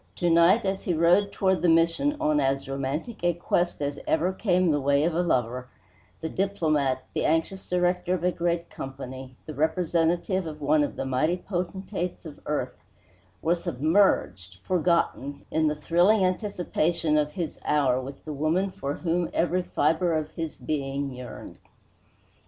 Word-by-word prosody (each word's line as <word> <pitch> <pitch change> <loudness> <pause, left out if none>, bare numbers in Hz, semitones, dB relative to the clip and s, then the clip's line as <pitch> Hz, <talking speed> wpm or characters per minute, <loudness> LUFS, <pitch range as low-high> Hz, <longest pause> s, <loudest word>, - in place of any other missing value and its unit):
To 175 -1 +1
night, 170 +7 +5
as 190 0 -1
he 175 - +1
rode 175 +5 +4
toward 190 -1 +1
the 175 - +3
Mission 165 - +3
on 150 -1 +2
as 135 -1 0
romantic 140 - -4
a 175 -1 +2
quest 175 -2 0
as 145 0 -3
ever 175 +4 +1
came 185 -3 +2
the 145 -1 +1
way 140 +1 +3
of 170 +1 +1
a 170 - +1
lover, 125 -6 0 0.5
the 160 - -2
diplomat, 155 -9 0
the - - -1
anxious 165 +4 0
director 180 0 +1
of 175 - -5
a 180 - +3
great 170 -1 -2
Company, 130 -1 -8
the 155 - -7
representative 170 +4 0
of 155 -1 -7
one 150 +1 +3
of 145 - -3
the - - -3
mighty 155 +7 +1
potentates 180 -1 -4
of 155 -3 -9
earth, 150 - -3 0.6
were 165 - +3
submerged, 145 - +1
forgotten, 170 -5 0
in 155 0 +2
the 150 - 0
thrilling 175 +6 +3
anticipation 175 -5 0
of 150 0 +1
his 175 -5 -4
hour 135 -4 +2
with 135 +1 -9
the 155 - -4
woman 160 +7 0
for 140 -4 -4
whom 175 0 -1
every 175 +2 +2
fiber 160 0 +1
of 155 0 -4
his 165 -2 -5
being 140 -2 -3
yearned. 125 -1 -9
165 Hz, 165 wpm, -26 LUFS, 145-180 Hz, 0.6 s, night